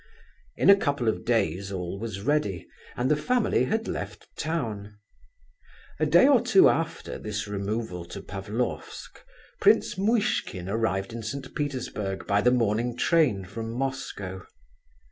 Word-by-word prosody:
In - - +6
a - - +9
couple 145 - -1
of 110 - 0
days 100 -5 0
all 90 0 -4
was 105 -3 -5
ready, 105 - 0 0.3
and 125 +3 +1
the - - +5
family 240 +8 +1
had 225 +1 -1
left - - -5
town. 110 -10 -3 1.0
A 155 - +2
day 170 - +6
or 270 -5 +5
two 195 - +6
after 165 0 -2
this 105 -1 -4
removal 100 -2 -3
to 85 - -8
Pavlofsk, 105 +5 -5 0.4
Prince - - +3
Muishkin 200 - 0
arrived 100 -1 -1
in 115 - -5
St. 130 +4 -6
Petersburg 125 -9 -3
by 100 0 +2
the 125 - +4
morning 120 0 +1
train 125 - +2
from 115 +4 -6
Moscow. 115 -8 -4
115 Hz, 140 wpm, -27 LUFS, 100-145 Hz, 1.0 s, a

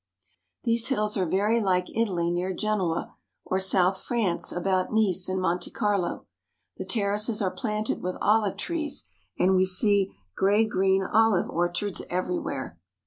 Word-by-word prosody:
These 230 -1 +1
hills 215 -5 0
are 185 -4 0
very 210 +6 +2
like 180 -3 0
Italy 180 -7 0
near 180 +2 -1
Genoa, 195 -6 -1 0.3
or 190 - 0
south 190 0 +2
France 215 -8 -1
about 185 +1 0
Nice 190 -5 +1
and 190 0 -1
Monte 180 -1 -1
Carlo. 200 -4 -1 0.5
The - - -6
terraces 210 0 +1
are 190 -3 0
planted 215 -3 -2
with 180 0 -3
olive 210 -1 +2
trees 320 -4 -3 0.3
and 190 +1 +3
we 185 0 +3
see 195 +1 +1 0.2
gray 205 +3 +3
green 190 -1 +2
olive 220 -1 +2
orchards 175 +3 -1
everywhere. 175 - -3
195 Hz, 140 wpm, -26 LUFS, 185-215 Hz, 0.5 s, and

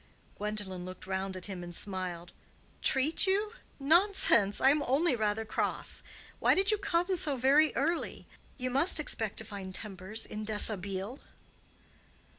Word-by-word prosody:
Gwendolen 205 -3 -2
looked 185 +1 -9
round 190 0 -3
at 185 - -8
him 190 -3 -7
and 175 0 -7
smiled. 180 -3 -4 0.5
"Treat 295 +8 +2
you? 415 +3 0 0.3
Nonsense! 295 - +4
I 265 - +5
am 295 +1 +1
only 285 +3 +2
rather 220 0 -1
cross. 215 - 0 0.4
Why - - +4
did 385 +2 +4
you 425 - 0
come 355 0 0
so 295 -5 +1
very 280 +5 +4
early? 325 +5 -2 0.3
You 255 -1 -3
must 295 +7 +4
expect 220 -8 -1
to 220 - -3
find 195 -3 -7
tempers 210 +1 -4
in 215 0 -6
dishabille." 205 +1 -1
220 Hz, 145 wpm, -30 LUFS, 195-305 Hz, 0.5 s, I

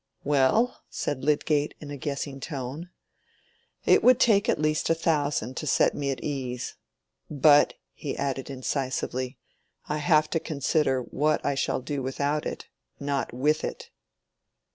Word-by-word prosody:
"Well," 145 - +2
said 140 -3 -3
Lydgate 150 0 +1
in 145 -1 -8
a - - -4
guessing 140 0 -4
tone, 140 +4 -5 1.0
"it - - +5
would 250 0 +6
take 220 -1 +4
at 165 - +2
least 155 0 +1
a 165 - +4
thousand 145 -6 0
to 155 - -4
set - - +3
me 140 -1 -2
at 135 - -3
ease. 130 -4 -3 0.6
But," 145 0 +5 0.2
he - - -5
added, 135 -1 -2
incisively, 130 -1 -2 0.5
"I 150 - -1
have 155 0 +4
to 165 - +1
consider 140 -3 0
what 150 +5 0
I - - +2
shall 135 - -1
do 140 +1 -3
without 140 +3 -1
it, - - -6 0.3
not 140 -1 -2
with 150 +5 +1
it." - - -5
145 Hz, 145 wpm, -27 LUFS, 135-155 Hz, 1.0 s, would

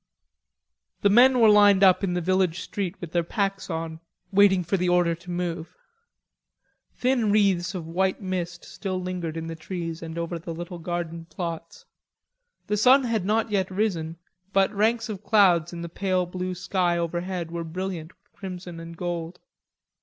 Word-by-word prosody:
The 200 - +4
men 250 +4 +6
were 225 - +7
lined 205 -2 +6
up 190 0 +5
in 180 -2 0
the 180 - 0
village 185 0 +1
street 195 -2 -4
with 170 -3 -7
their 175 - +2
packs 195 +2 -2
on, 160 -1 -4 0.3
waiting 195 -2 +5
for 175 +4 0
the 180 -1 +1
order 175 -1 +3
to 170 +2 -11
move. 175 -2 -4 1.2
Thin 245 -4 +1
wreaths 195 -3 +2
of 175 -3 -4
white 185 +3 0
mist 180 -3 -4
still 185 -3 -4
lingered 180 -3 -4
in 165 - -4
the 165 0 -5
trees 165 0 -5
and 165 0 -7
over 170 0 -3
the 165 0 -6
little 175 +1 -7
garden 170 -1 -4
plots. 170 -1 -6 0.8
The 210 - -1
sun 260 +6 +6
had 225 -6 -1
not 220 +2 +1
yet 190 -2 +1
risen, 180 -5 -1 0.4
but 195 +2 +3
ranks 225 +2 +1
of 210 -2 -6
clouds 180 -7 +4
in 170 -1 -6
the - - -4
pale 185 +1 0
blue 185 +1 -4
sky 180 -1 0
overhead 175 0 -3
were 170 0 -3
brilliant 170 -1 -5
with - - -37
crimson 180 -3 -8
and 165 0 -9
gold. 175 0 -4
180 Hz, 170 wpm, -25 LUFS, 170-195 Hz, 1.2 s, were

